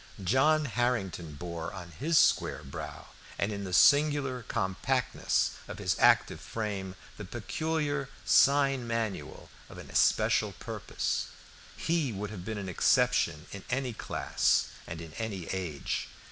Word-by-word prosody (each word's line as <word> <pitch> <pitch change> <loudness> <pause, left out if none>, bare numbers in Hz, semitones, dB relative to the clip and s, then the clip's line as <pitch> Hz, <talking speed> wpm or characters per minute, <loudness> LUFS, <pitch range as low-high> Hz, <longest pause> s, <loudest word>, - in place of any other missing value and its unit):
John 150 - +3
Harrington 100 - -1
bore 85 +1 -5
on 90 -4 -9
his 150 - 0
square - - +3
brow 70 - -8 0.3
and 100 - 0
in 100 -1 -4
the 95 - -5
singular 140 +3 +4
compactness 95 -4 0 0.2
of - - -7
his - - 0
active - - +4
frame 100 -4 -4 0.2
the 105 - -6
peculiar 145 - -2 0.2
sign 135 -3 +4
manual 115 -3 -4 0.2
of - - -11
an - - -10
especial - - +3
purpose. - - -3 0.5
He 160 -6 0
would 105 0 -5
have 95 -5 -7
been 110 +3 -4
an 100 -2 -5
exception 80 -3 +2
in 100 - -8
any 125 -1 -1
class - - +1 0.2
and 80 0 -6
in 80 -2 -10
any 100 -6 -4
age. 90 -6 -3
110 Hz, 135 wpm, -30 LUFS, 95-135 Hz, 0.5 s, singular